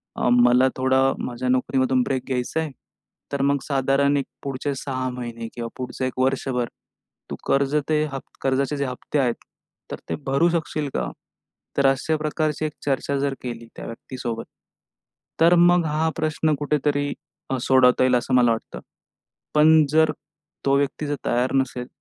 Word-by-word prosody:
"अ, - - 0
मला 125 +1 +5
थोडा 130 0 +3 0.2
माझ्या 125 +1 -3
नोकरीमधून 130 0 +2
ब्रेक 130 -2 -2
घ्यायचा 130 +4 -1
आहे, 160 -3 -2 0.6
तर 140 - -1
मग 140 +1 +3
साधारण 140 +1 +2
एक 140 - -1 0.2
पुढचे 140 +1 -3
6 130 -1 -3
महिने 120 -2 -6
किंवा 115 -1 -5
पुढचं 130 0 -4
1 130 0 -4
वर्षभर 130 -2 0 0.6
तू - - -4
कर्ज 140 +1 +2
ते 155 -1 +3
ह 135 - -2 0.2
कर्जाचे 135 +2 0
जे 140 - 0
हप्ते 130 +3 -3
आहेत, 125 -3 +2 0.6
तर - - -5
ते - - 0
भरू 140 +6 +3
शकशील 155 -3 -2
का?" - - -1 0.7
तर 140 - +3
अशा 155 +4 0
प्रकारची 155 0 -1
एक 150 - -3
चर्चा 140 0 0
जर 140 0 0
केली 115 -2 -6
त्या - - -8
व्यक्तीसोबत, 115 0 -6 1.0
तर 170 +2 +7
मग 175 0 +5
हां, 155 +1 0
प्रश्न 155 -1 +1
कुठेतरी 145 -1 0 0.5
सोडवता 130 -1 +4
येईल, 130 -1 +4
असं 125 +2 -1
मला 120 -2 +5
वाटतं. 115 - -4 0.8
पण 155 0 +6
जर 160 +1 +4 0.5
तो 135 - +4
व्यक्ती 140 +2 -1
जर 145 - -1
तयार 125 +2 +1
नसेल, 125 -2 -1
135 Hz, 160 wpm, -23 LUFS, 125-150 Hz, 1.0 s, तर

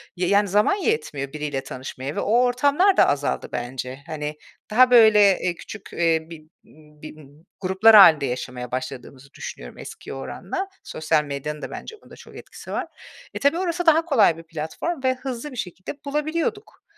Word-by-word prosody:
Y 180 0 -1
yani 200 +2 +3
zaman 210 - +3
yetmiyor 155 - -2
biriyle 150 -3 -3
tanışmaya 130 +2 -7
ve - - -2
o - - -1
ortamlar 285 +10 +3
da - - +6
azaldı 145 0 -1
bence. 125 +2 -5
Hani, 150 -1 -5 0.3
daha, 250 +3 +5
böyle, 210 -5 +6
eee, 180 -1 -2
küçük, 205 +4 -10
eee, 165 -2 +1
bir 165 -2 -11 0.6
bir 155 - -9 0.5
gruplar 190 +4 +5
hâlinde 160 -8 +8
yaşamaya 125 -1 -5
başladığımızı 130 +1 -7
düşünüyorum - - -9
eskiye - - -9
oranla. 185 - -5 0.2
Sosyal 155 -1 0
medyanın 150 +1 -5
da - - -7
bence 445 - -8
bunda - - -15
çok - - -15
etkisi - - -11
var. - - -3 0.5
E, - - -5
tabii, 285 +4 +2
orası 355 -1 -2
daha 325 0 +4
kolay 225 - +3
bir 165 - -11
platform 165 - -5
ve 260 0 +3
hızlı 260 +1 -6
bir 255 - -10
şekilde 185 -2 -6
bulabiliyorduk. 310 +8 -3
185 Hz, 165 wpm, -23 LUFS, -, 0.6 s, hâlinde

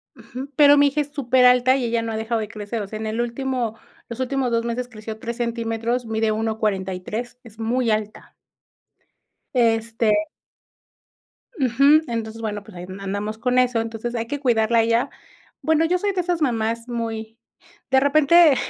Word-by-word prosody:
Ujú, 255 +3 -9
pero 290 0 +7
mi 285 0 +6
hija 285 +2 0
es 290 - -4
superalta 255 -2 +4
y 265 -2 -1
ella 235 0 0
no 225 - -3
ha 220 - -3
dejado 225 +1 -1
de 215 - -3
crecer, 215 +2 -5
o - - -7
sea, 215 +2 -7
en 220 - -4
el 220 +2 -3
último, 240 -1 -2 0.3
los 235 - -7
últimos 260 -1 -1
dos 230 0 +1
meses 235 +1 -3
creció 220 -2 -8
3 235 +1 -5
centímetros, 235 0 -2
mide 220 0 0
1.43 215 +1 -2
es 225 -3 -15
muy 235 +2 0
alta. 215 0 -3 1.2
Este 225 -2 +2 1.5
Ujú, 275 +4 +5
entonces, 225 -1 -4
bueno, 210 -2 -4
pues 215 -2 -14
ahí, 175 0 -7
andamos 200 +2 -4
con 250 +2 +1
eso, 250 -2 +2
entonces, 225 +1 -4
hay 230 -1 -2
que 285 +4 -3
cuidarla 230 -3 +2
a - - +6
ella. 230 +2 +1 0.5
Bueno, 320 0 +2
yo 360 +2 +2
soy 405 +2 0
de 370 -2 0
esas 350 -1 -2
mamás 230 -3 0
muy, 225 -1 -4 0.5
de 265 - +6
repente, 305 +2 +5
230 Hz, 175 wpm, -22 LUFS, 220-255 Hz, 1.5 s, pero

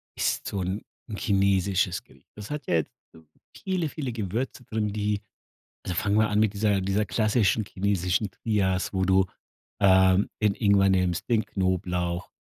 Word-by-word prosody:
isst - - -1
so 100 - -2
'n 95 +3 -3 0.3
'n 105 - -5
chinesisches 95 -3 +1
Geri - - -23
das 105 +3 -9
hat 150 -1 -5
ja - - +2
jetzt 80 - -1 0.2
so 80 - -16 0.3
viele, 185 -5 -2
viele 135 -4 -4
Gewürze 115 +5 -3
drin, 105 -2 -2
die 105 -1 -1 0.6
also 90 - -3
fangen 100 +4 +1
wir 110 0 +3
an 105 0 +1
mit 110 -2 +2
dieser 100 -1 +1
dieser 100 +3 0
klassischen 110 +1 +2
chinesischen 95 0 -1
Trias, 95 -3 -1
wo 95 -1 0
du, 95 0 +3 0.5
ähm, 95 0 +5
den 105 -2 +3
Ingwer 100 -3 +3
nimmst, 90 -2 0
den 110 -3 +3
Knoblauch, 90 -3 -1
100 Hz, 165 wpm, -26 LUFS, 95-105 Hz, 0.6 s, ähm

